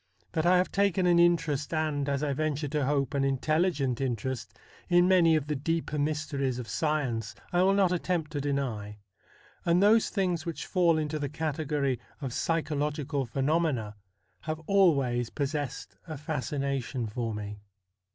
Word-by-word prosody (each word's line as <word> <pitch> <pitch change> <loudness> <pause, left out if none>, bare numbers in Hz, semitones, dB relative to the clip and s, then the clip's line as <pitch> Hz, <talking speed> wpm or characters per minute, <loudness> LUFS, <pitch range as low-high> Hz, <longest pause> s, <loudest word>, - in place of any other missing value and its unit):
That 160 +1 0
I 180 +1 +6
have 180 - +1
taken 195 -2 +2
an 175 -1 +5
interest, 165 -4 +2
and, 150 -3 0
as 140 +1 -1
I 145 -2 0
venture 150 +1 -1
to 145 -2 0
hope, 140 -2 0
an 140 - +1
intelli 155 +6 +2
gent 135 -5 -2
interest 130 -1 -3 0.4
in 175 0 +5
many 175 -4 +5
of 150 -3 0
the 150 0 -2
deeper 155 +1 -2
mysteries 145 -3 -1
of 125 -2 -6
science, 125 -5 -1 0.2
I 175 - +4
will 195 +1 +4
not 195 -3 +3
attempt 175 -3 -1
to 145 -3 -2
deny; 125 -8 -2 0.7
and 170 +1 +3
those 215 +3 +5
things 180 -5 0
which 170 -2 -5
fall 170 -3 +3
into 155 0 -2
the 145 -1 -2
category 150 -4 -1 0.2
of 135 -5 -4
psychological 150 -3 -1
phenomena 135 -5 0 0.4
have 155 - -4
always 140 - +3
pos 140 -1 -2
sessed 145 -4 -4 0.2
a 155 -2 -5
fascination 140 -3 -2
for 110 +1 -3
me. 105 0 -6
150 Hz, 160 wpm, -29 LUFS, 135-165 Hz, 0.7 s, I